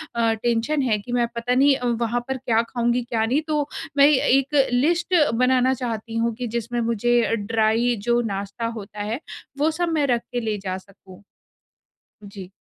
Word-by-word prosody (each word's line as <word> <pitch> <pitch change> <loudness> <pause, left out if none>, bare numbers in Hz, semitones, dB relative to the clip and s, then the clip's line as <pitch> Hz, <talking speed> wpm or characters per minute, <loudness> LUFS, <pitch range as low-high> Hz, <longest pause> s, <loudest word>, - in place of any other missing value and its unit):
अ, 230 -1 +2
tension 240 +5 +1
है 235 -5 +1
कि 240 +4 -9
मैं 240 -1 +2
पता 245 +2 -1
नहीं 275 +1 +5
अ, 250 - -5 0.2
वहाँ 235 +1 0
पर 265 0 -2
क्या 230 -3 +1
खाऊँगी, 240 0 0
क्या 230 -2 -1
नहीं। 265 +7 +1
तो 300 -2 0 0.3
मैं 280 +1 +7
एक 275 0 +2 0.2
लिस्ट 340 +8 +1 0.2
बनाना 255 +2 +3
चाहती 230 -3 -5
हूँ 230 0 0
कि 245 0 -4
जिसमें 240 +1 -3
मुझे 235 +1 +1
ड्राइ 225 +3 +1
जो 240 0 +4
नाश्ता 200 +4 -5
होता 205 +1 -9
है, 220 +6 -3 0.4
वो 315 +2 +2
सब 345 +2 -1
मैं 295 -2 +2
रख 240 -2 +1
के 245 - -1
ले 215 -2 -2
जा 185 0 -2
सकूँ। 190 0 -16 1.0
जी। 195 -2 -10
240 Hz, 180 wpm, -23 LUFS, 225-260 Hz, 1.0 s, मैं